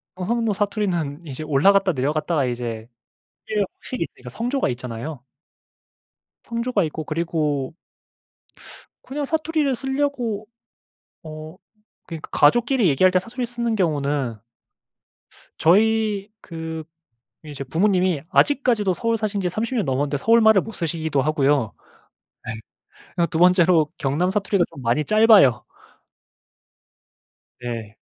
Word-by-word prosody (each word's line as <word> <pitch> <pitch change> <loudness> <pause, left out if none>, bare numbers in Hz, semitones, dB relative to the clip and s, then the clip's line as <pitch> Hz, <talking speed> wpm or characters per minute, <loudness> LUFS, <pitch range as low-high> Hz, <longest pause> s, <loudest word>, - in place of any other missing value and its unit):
경상도 220 +4 -1
사투리는 185 -7 -2
이제 145 0 -6
올라갔다 190 +7 +3
내려갔다가 150 +2 0
이제 120 -2 -4 0.6
이게 215 -1 0 0.2
확실히 250 -10 -3
있으니까 125 -5 -11
성조가 245 - -1
있잖아요. 125 +3 -6 1.2
성조가 235 -3 -1
있고 155 0 -5
그리고 155 -3 -2 1.3
그냥 285 +2 -4
사투리를 310 -2 0
쓰려고 265 -6 -2 0.8
어 155 +1 -9 0.5
그러니까 165 -3 -8
가족끼리 240 - +3
얘기할 175 +6 +4
때 185 - +3
사투리를 240 +6 -5
쓰는 235 -1 -2
경우는 145 - 0 1.2
저희 210 +2 +3
그 160 -1 -6 0.6
이제 145 -2 -7
부모님이 180 +2 +1
아직까지도 240 -9 +2
서울 230 +4 -1
사신지 200 -4 -1
30 230 +7 -3
년 215 -8 0
넘었는데 140 +2 0
서울말을 220 +1 +5
못 225 - -8
쓰시기도 160 -6 -1
하고요. 145 -6 +1 0.7
네. 115 - -4 0.6
그리고 170 -1 +2
2 160 - -2
번째로 175 -3 +4
경남 150 +7 0
사투리가 195 -2 +1
좀 135 - -11
많이 120 +5 +1
짧아요. 215 - +5 2.0
네. 115 -3 -6
175 Hz, 280 characters per minute, -22 LUFS, 145-220 Hz, 2.0 s, 서울말을